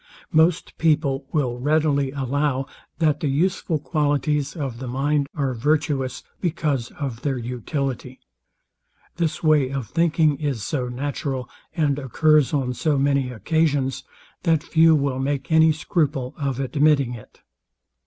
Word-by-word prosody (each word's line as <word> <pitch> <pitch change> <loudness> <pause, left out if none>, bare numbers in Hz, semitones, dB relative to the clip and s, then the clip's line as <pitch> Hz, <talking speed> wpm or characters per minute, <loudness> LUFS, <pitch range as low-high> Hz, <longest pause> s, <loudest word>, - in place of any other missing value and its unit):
Most 160 +2 +2
people 145 -4 +1
will 125 -6 -1
readily 145 0 +2
allow, 135 0 -1 0.3
that 155 -3 +2
the 150 - -1
useful 165 +3 0
qualities 145 0 0
of 135 -7 -4
the 130 - -5
mind 140 +3 0
are 140 -3 -1
virtuous, 140 0 0 0.2
because 150 -8 -1
of 130 -6 -5
their 135 -2 -1
utility. 125 +2 -4 1.0
This 170 -2 -1
way 150 -4 +4
of 135 -3 -3
thinking 160 -1 +2
is 140 -8 -2
so 125 -1 -2
natural, 135 0 -3 0.3
and 145 -4 +1
occurs 150 +1 +3
on 130 -4 0
so 150 +3 0
many 140 -1 +1
occasions, 135 - 0 0.4
that 160 -2 +2
few 160 0 +5
will 140 -3 0
make 135 0 -2
any 160 0 +6
scruple 150 -5 -1
of 135 -3 -2
admitting 140 -1 +2
it. 115 -3 -13
140 Hz, 135 wpm, -23 LUFS, 130-155 Hz, 1.0 s, any